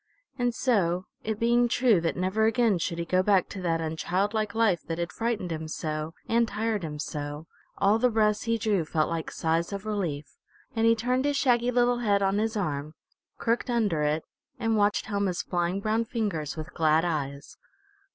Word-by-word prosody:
And 245 Hz, -1 st, +1 dB
so, 185 Hz, -8 st, +1 dB, 0.2 s
it 220 Hz, -1 st, -3 dB
being 240 Hz, +1 st, +3 dB
true 235 Hz, -6 st, +3 dB
that 165 Hz, -, -1 dB
never 190 Hz, +4 st, +1 dB
again 225 Hz, -4 st, +2 dB
should 170 Hz, 0 st, -2 dB
he 170 Hz, -, -2 dB
go 185 Hz, +2 st, +2 dB
back 190 Hz, -2 st, +3 dB
to 195 Hz, -, -6 dB
that 165 Hz, -2 st, 0 dB
unchildlike 200 Hz, +7 st, -1 dB
life 210 Hz, -7 st, +3 dB
that 165 Hz, -, -3 dB
had 170 Hz, 0 st, -3 dB
frightened 225 Hz, -6 st, -2 dB
him 160 Hz, -1 st, -4 dB
so, 155 Hz, +1 st, -4 dB
and 230 Hz, 0 st, +2 dB
tired 220 Hz, -1 st, -1 dB
him 155 Hz, -3 st, -5 dB
so, 145 Hz, 0 st, -5 dB, 0.3 s
all 200 Hz, +3 st, +3 dB
the 250 Hz, +2 st, +4 dB
breaths 215 Hz, -2 st, +1 dB
he 230 Hz, 0 st, +1 dB
drew 210 Hz, -5 st, +1 dB
felt 155 Hz, 0 st, 0 dB
like 165 Hz, -1 st, -3 dB
sighs 165 Hz, +2 st, -1 dB
of 200 Hz, +1 st, -5 dB
relief, 175 Hz, -9 st, -3 dB, 0.4 s
and 225 Hz, 0 st, +3 dB
he 230 Hz, -, +5 dB
turned 250 Hz, +4 st, 0 dB
his 290 Hz, -1 st, +1 dB
shaggy 245 Hz, -3 st, +3 dB
little 245 Hz, 0 st, +2 dB
head 200 Hz, -4 st, +2 dB
on 195 Hz, +1 st, +2 dB
his 220 Hz, +1 st, -1 dB
arm, 155 Hz, -5 st, -3 dB, 0.4 s
crooked 235 Hz, +2 st, 0 dB
under 210 Hz, -10 st, +1 dB
it, 150 Hz, +1 st, 0 dB, 0.3 s
and 225 Hz, -2 st, 0 dB
watched 205 Hz, 0 st, +2 dB
Helma's 200 Hz, -4 st, -1 dB
flying 175 Hz, +1 st, -1 dB
brown 220 Hz, +3 st, 0 dB
fingers 200 Hz, -, -3 dB
with 160 Hz, +3 st, -7 dB
glad 160 Hz, 0 st, +3 dB
eyes. 140 Hz, -4 st, -4 dB
200 Hz, 190 wpm, -27 LUFS, 165-225 Hz, 0.4 s, he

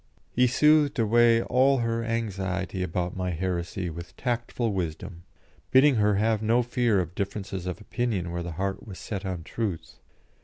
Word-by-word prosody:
He 125 Hz, +1 st, +3 dB
soothed 150 Hz, +2 st, +4 dB
away 115 Hz, +1 st, +4 dB
all 135 Hz, +2 st, +3 dB
her 115 Hz, -1 st, -1 dB
anxiety 95 Hz, -5 st, -2 dB
about 90 Hz, 0 st, -2 dB
my 90 Hz, -1 st, -2 dB
heresy 90 Hz, +1 st, -2 dB
with 85 Hz, +2 st, -9 dB
tactful 120 Hz, -2 st, -1 dB
wisdom, 85 Hz, 0 st, -4 dB, 0.4 s
bidding 130 Hz, 0 st, +5 dB
her 105 Hz, -1 st, +3 dB
have 110 Hz, +1 st, +1 dB
no 115 Hz, +3 st, +3 dB
fear 120 Hz, -3 st, +1 dB
of 90 Hz, -1 st, -3 dB
differences 95 Hz, -1 st, -4 dB
of 90 Hz, -, -4 dB
opinion 105 Hz, -6 st, -2 dB
where 85 Hz, 0 st, -3 dB
the 85 Hz, -1 st, -5 dB
heart 95 Hz, +5 st, -3 dB
was 95 Hz, -3 st, -8 dB
set 100 Hz, -2 st, -5 dB
on 90 Hz, -3 st, -4 dB
truth. 100 Hz, -3 st, -4 dB
105 Hz, 160 wpm, -27 LUFS, 90-120 Hz, 0.4 s, bidding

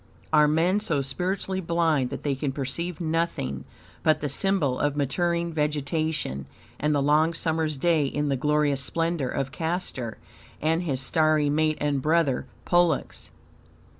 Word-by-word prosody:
Are 150 Hz, -1 st, +6 dB
men 170 Hz, +6 st, +2 dB
so 155 Hz, -9 st, 0 dB
spiritually 185 Hz, +6 st, -2 dB
blind 165 Hz, -6 st, +1 dB
that 140 Hz, -, -6 dB
they 145 Hz, -, +1 dB
can 135 Hz, +1 st, -2 dB
perceive 150 Hz, +5 st, -3 dB
nothing 160 Hz, -, -2 dB, 0.4 s
but 155 Hz, -, +3 dB
the 145 Hz, -, -2 dB
symbol 150 Hz, -4 st, +1 dB
of 145 Hz, -1 st, +1 dB
maturing 170 Hz, +4 st, 0 dB
vegetation 150 Hz, -, -1 dB, 0.3 s
and 150 Hz, +1 st, +1 dB
the 140 Hz, -, +2 dB
long 155 Hz, +3 st, +3 dB
summer's 160 Hz, -2 st, 0 dB
day 160 Hz, 0 st, +2 dB
in 145 Hz, +2 st, -1 dB
the 140 Hz, -, +1 dB
glorious 150 Hz, 0 st, +1 dB
splendor 165 Hz, -1 st, -1 dB
of 135 Hz, -1 st, -2 dB
Castor 160 Hz, -8 st, -3 dB, 0.4 s
and 160 Hz, +2 st, +1 dB
his 140 Hz, -7 st, -2 dB
starry 155 Hz, +1 st, +2 dB
mate 155 Hz, +1 st, +1 dB
and 145 Hz, -2 st, 0 dB
brother, 155 Hz, -3 st, +1 dB, 0.2 s
Pollux? 175 Hz, -4 st, +1 dB
155 Hz, 145 wpm, -26 LUFS, 140-165 Hz, 0.4 s, Are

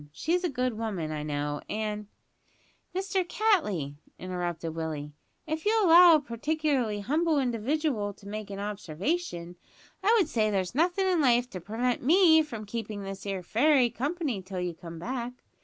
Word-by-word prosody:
She's 345 Hz, -, -1 dB
a 355 Hz, -, +1 dB
good 250 Hz, -4 st, -2 dB
woman, 190 Hz, -9 st, -3 dB
I 155 Hz, -1 st, -3 dB
know, 145 Hz, -1 st, -3 dB
and 210 Hz, -1 st, -3 dB, 0.4 s
" -, -, -38 dB
"Mister 380 Hz, 0 st, 0 dB
Cattley," 300 Hz, -, 0 dB, 0.2 s
interrupted 175 Hz, -3 st, -4 dB
Willie, 155 Hz, -2 st, -4 dB, 0.3 s
"if 315 Hz, 0 st, -3 dB
you'll 435 Hz, 0 st, +3 dB
allow 340 Hz, 0 st, +9 dB
a -, -, +4 dB
partic'larly 265 Hz, -4 st, -1 dB
humble 315 Hz, +6 st, +1 dB
individual 250 Hz, -2 st, 0 dB
to 200 Hz, -, -15 dB
make 215 Hz, 0 st, -6 dB
a 200 Hz, -, -6 dB
observation, 195 Hz, -, -3 dB, 0.5 s
I 435 Hz, +4 st, +5 dB
would 380 Hz, -8 st, +3 dB
say 220 Hz, -7 st, +1 dB
there's 190 Hz, -3 st, -1 dB
nothin' 350 Hz, +7 st, +2 dB
in 365 Hz, -4 st, +2 dB
life 245 Hz, -2 st, +3 dB
to 185 Hz, -, -6 dB
prevent 235 Hz, +6 st, -1 dB
me 320 Hz, +3 st, +6 dB
from 230 Hz, -9 st, -6 dB
keeping 210 Hz, -1 st, -5 dB
this 195 Hz, +1 st, -7 dB
'ere 195 Hz, -2 st, -3 dB
fairy 250 Hz, -, +3 dB
company 285 Hz, -, -2 dB
till 185 Hz, 0 st, -6 dB
you 180 Hz, -1 st, -2 dB
come 165 Hz, 0 st, -10 dB
back. 240 Hz, +6 st, -4 dB
230 Hz, 165 wpm, -28 LUFS, 190-315 Hz, 0.5 s, allow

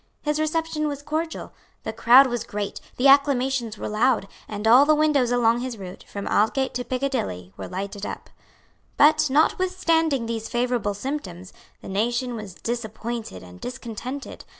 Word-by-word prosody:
His 300 Hz, 0 st, 0 dB
reception 310 Hz, 0 st, -1 dB
was 285 Hz, -1 st, -5 dB
cordial. 315 Hz, +2 st, -4 dB, 0.3 s
The -, -, -4 dB
crowd 255 Hz, +4 st, +7 dB
was 240 Hz, -3 st, -2 dB
great; 205 Hz, -3 st, -5 dB, 0.2 s
the 260 Hz, -, +4 dB
acclamations 265 Hz, -5 st, +3 dB
were -, -, -5 dB
loud; 220 Hz, 0 st, +1 dB, 0.2 s
and 210 Hz, +1 st, -3 dB
all 245 Hz, +5 st, +8 dB
the 305 Hz, +1 st, +4 dB
windows 300 Hz, -5 st, +2 dB
along 235 Hz, -1 st, +3 dB
his 245 Hz, -2 st, -4 dB
route, 185 Hz, -2 st, -9 dB
from 200 Hz, -1 st, -6 dB
Aldgate 260 Hz, +6 st, +1 dB
to 245 Hz, -, -2 dB
Piccadilly, 245 Hz, -, -3 dB
were -, -, -7 dB
lighted 195 Hz, +2 st, -5 dB
up. -, -, -6 dB, 0.7 s
But, 305 Hz, 0 st, +5 dB
notwithstanding 325 Hz, -2 st, +2 dB
these 225 Hz, -1 st, -4 dB
favourable 240 Hz, -4 st, 0 dB
symptoms, 195 Hz, -7 st, -6 dB, 0.3 s
the -, -, -8 dB
nation 240 Hz, +5 st, -1 dB
was 210 Hz, -5 st, -7 dB
disappointed 230 Hz, -, -5 dB
and 90 Hz, 0 st, -14 dB
discontented. 250 Hz, +2 st, -6 dB
245 Hz, 150 wpm, -24 LUFS, 215-280 Hz, 0.7 s, all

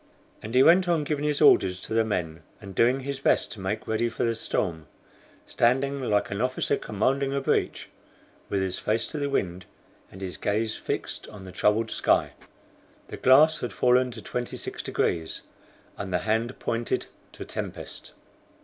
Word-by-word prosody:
And 110 Hz, +3 st, -6 dB
he 130 Hz, -, +7 dB
went 180 Hz, +4 st, +6 dB
on 170 Hz, -3 st, +2 dB
giving 145 Hz, 0 st, -2 dB
his 150 Hz, -1 st, 0 dB
orders 95 Hz, -10 st, +5 dB
to -, -, -5 dB
the 115 Hz, 0 st, +4 dB
men, 85 Hz, -7 st, -3 dB, 0.2 s
and 100 Hz, -2 st, -10 dB
doing 125 Hz, +7 st, +3 dB
his 140 Hz, 0 st, -4 dB
best -, -, +2 dB
to 110 Hz, -, -7 dB
make 105 Hz, +4 st, -3 dB
ready 115 Hz, +2 st, 0 dB
for 115 Hz, -, -3 dB
the 115 Hz, -, +2 dB
storm, 85 Hz, -7 st, -2 dB, 0.6 s
standing, 135 Hz, +3 st, +1 dB
like 105 Hz, -6 st, 0 dB
an 100 Hz, +2 st, -2 dB
officer 130 Hz, +2 st, 0 dB
commanding 135 Hz, +5 st, 0 dB
a -, -, +1 dB
breach, 135 Hz, -, 0 dB, 0.6 s
with 100 Hz, -1 st, 0 dB
his 95 Hz, -1 st, -2 dB
face 110 Hz, +2 st, 0 dB
to 150 Hz, -, -4 dB
the 140 Hz, 0 st, -1 dB
wind, 90 Hz, -8 st, -2 dB, 0.5 s
and 95 Hz, -, -12 dB
his 95 Hz, -2 st, -5 dB
gaze 110 Hz, +2 st, -1 dB
fixed -, -, -4 dB
on 100 Hz, -3 st, -11 dB
the 95 Hz, -, -9 dB
troubled 105 Hz, +4 st, +1 dB
sky. -, -, +2 dB, 0.8 s
The -, -, -6 dB
glass 150 Hz, +5 st, +6 dB
had 125 Hz, -, -4 dB
fallen 125 Hz, 0 st, +3 dB
to 120 Hz, -, -9 dB
26 120 Hz, -1 st, -4 dB
degrees, 80 Hz, -1 st, -1 dB, 0.6 s
and 100 Hz, -2 st, -4 dB
the 90 Hz, -, +2 dB
hand 115 Hz, +3 st, 0 dB
pointed 115 Hz, 0 st, -1 dB, 0.3 s
to -, -, -8 dB
tempest. -, -, -7 dB
115 Hz, 175 wpm, -26 LUFS, 100-135 Hz, 0.8 s, he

